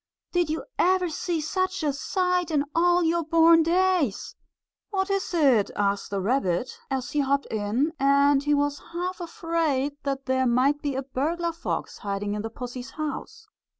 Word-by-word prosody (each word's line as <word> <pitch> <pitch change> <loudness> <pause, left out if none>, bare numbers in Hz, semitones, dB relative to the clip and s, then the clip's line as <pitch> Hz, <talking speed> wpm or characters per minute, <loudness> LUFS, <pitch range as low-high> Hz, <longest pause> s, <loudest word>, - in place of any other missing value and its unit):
Did 350 -3 +1
you 315 - -2 0.2
ever 365 0 +3
see 330 +2 -2
such 370 +3 -1
a 290 -2 +1
sight 360 +4 0
in 295 -3 +1
all 350 +1 +3
your 335 +1 +1
born 330 +1 +5
days?" 345 - +1 0.5
"What 385 -1 -1
is 395 -1 -1
it?" 275 - +3
asked 200 0 0
the 200 - -2
rabbit, 195 -1 0
as 265 -2 -3
he 300 - 0
hopped 280 0 +1
in, 225 +9 0
and 280 +1 +4
he 295 +1 +2
was 285 0 0
half 360 +2 -3
afraid 325 -5 -1
that 275 -1 -3
there 260 0 +1
might 265 +5 +2
be 285 -2 -2
a 270 - -2
burglar 320 +6 -1
fox 335 - -4
hiding 205 0 -3
in 210 - -3
the 225 - -4
pussy's 245 +2 -7
house. 310 +9 -6
290 Hz, 170 wpm, -26 LUFS, 260-340 Hz, 0.5 s, born